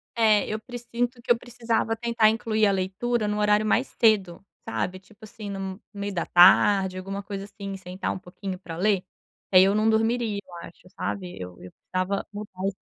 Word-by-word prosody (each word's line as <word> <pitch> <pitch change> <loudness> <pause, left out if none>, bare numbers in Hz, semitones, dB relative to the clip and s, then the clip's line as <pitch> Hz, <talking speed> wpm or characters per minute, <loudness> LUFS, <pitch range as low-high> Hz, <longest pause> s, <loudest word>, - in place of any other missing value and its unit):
É 215 -3 +4
eu 215 0 -3
precinto 240 +1 -4
que 240 - -1
eu 235 - +5
precisava 230 -2 -1
tentar 230 -1 +3
incluir 220 -1 +1
a - - +3
leitura 195 +5 -1
em 210 - 0
um 210 - -2
horário 210 +1 +3
mais 245 +5 +2
cedo, 195 -5 +2 0.2
sabe? 180 +12 -2
Tipo 205 +3 -22
assim 210 -1 -9
no 195 +1 -5
meio 200 -1 -4
da 170 - -1
tarde, 190 +1 +6
alguma 195 +1 -5
coisa 200 -1 -6
assim 200 -1 -7
sentar 185 0 -4
um - - -6
pouquinho 185 0 -7
para 165 -3 -8
ler, 195 0 +2
que 185 +1 -13
aí 185 - +10
eu 195 +1 +3
não 215 +1 +3
dormiria 225 -1 +1
eu 180 - -16
acho 175 +1 -18
sabe, 180 -3 -4
eu 90 -1 -8
eu 90 - -10
precisava 185 +2 -3
mudar 205 -1 -8
esse 195 - -3
205 Hz, 200 wpm, -25 LUFS, 190-220 Hz, 0.2 s, aí